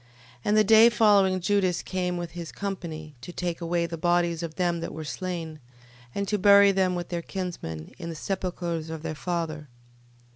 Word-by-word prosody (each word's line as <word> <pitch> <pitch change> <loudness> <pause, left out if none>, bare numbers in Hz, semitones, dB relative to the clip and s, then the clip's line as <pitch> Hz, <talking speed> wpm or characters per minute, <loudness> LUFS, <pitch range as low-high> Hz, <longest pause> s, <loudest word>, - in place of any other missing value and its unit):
12:39. 125 - -29 0.4
And 210 +1 +3
the 215 - +6
day 220 +2 +7
following 200 -5 +4
Judas 185 -1 +1
came 180 -1 -2
with 175 -1 -5
his 170 -2 -7
company, 165 -6 -5
to 175 - -8
take 175 -1 -3
away 170 0 0
the 165 -1 -6
bodies 175 -1 +1
of 165 -2 -5
them 175 -2 0
that 165 - -5
were 160 - -5
slain, 165 0 -5 0.6
and 200 0 -1
to 210 0 0
bury 200 0 +7
them 185 -2 +1
with 175 -1 -4
their 175 -1 -2
kinsmen, 170 - -6
in 170 -1 -5
the 165 - -5
sepulchres 175 -2 -3
of 160 -1 -6
their 160 -1 -3
fathers. 155 -1 -3
175 Hz, 190 wpm, -26 LUFS, 165-190 Hz, 0.6 s, day